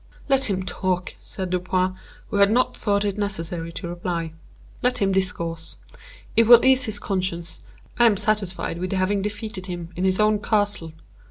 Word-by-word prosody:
"Let 270 -3 +4
him 190 -1 -1
talk," 185 -1 -2
said 185 -2 -6
Dupin, 185 +1 0 0.4
who - - 0
had 200 0 +5
not 245 +4 +2
thought 205 -1 0
it 205 0 -2
necessary 170 -4 -3
to 175 - -5
reply. 170 -2 -4 0.5
"Let 250 0 +1
him 195 -1 +1
discourse; 170 -3 -2 0.6
it 230 0 +4
will 240 +1 +8
ease 260 0 +6
his 215 -3 -2
conscience, 185 -4 -3 0.4
I 240 - +7
am 210 -3 +3
satisfied 200 -5 0
with 185 +1 -3
having 195 +1 +1
defeated 205 -2 -5
him 175 -2 -6
in 180 - -3
his 190 +1 +1
own 210 0 +3
castle. 205 -6 0
190 Hz, 170 wpm, -23 LUFS, 180-210 Hz, 0.6 s, will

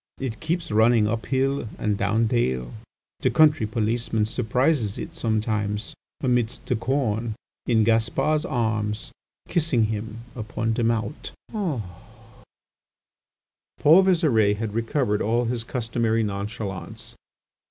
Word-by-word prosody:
It 130 -4 -4
keeps 165 -2 -2
running 110 0 +4
up 115 +1 -2
hill 135 -3 0
and 105 -1 0
down 105 +3 +1
dale; 65 - 0 0.5
the - - +2
country 150 -8 +4
policeman 110 0 0
surprises 125 0 +1
it - - -6
sometimes, 105 -3 -1 0.3
amidst 125 -3 0
the 125 - 0
corn, 115 -2 -1 0.3
in 115 -3 +4
Gaspar's 115 +7 +2
arms 110 - -1 0.4
kissing 150 -9 +2
him 110 +2 -6
upon 115 -1 -2
the 115 - -1
mouth." 115 +4 -1 0.2
Paul 175 - -2 2.2
Visire 145 - +3
had 110 -1 -3
recovered 115 -1 0
all 120 +3 +1
his 115 0 -2
customary 115 -2 0
nonchalance. 105 +1 -5
115 Hz, 110 wpm, -24 LUFS, 105-125 Hz, 2.2 s, running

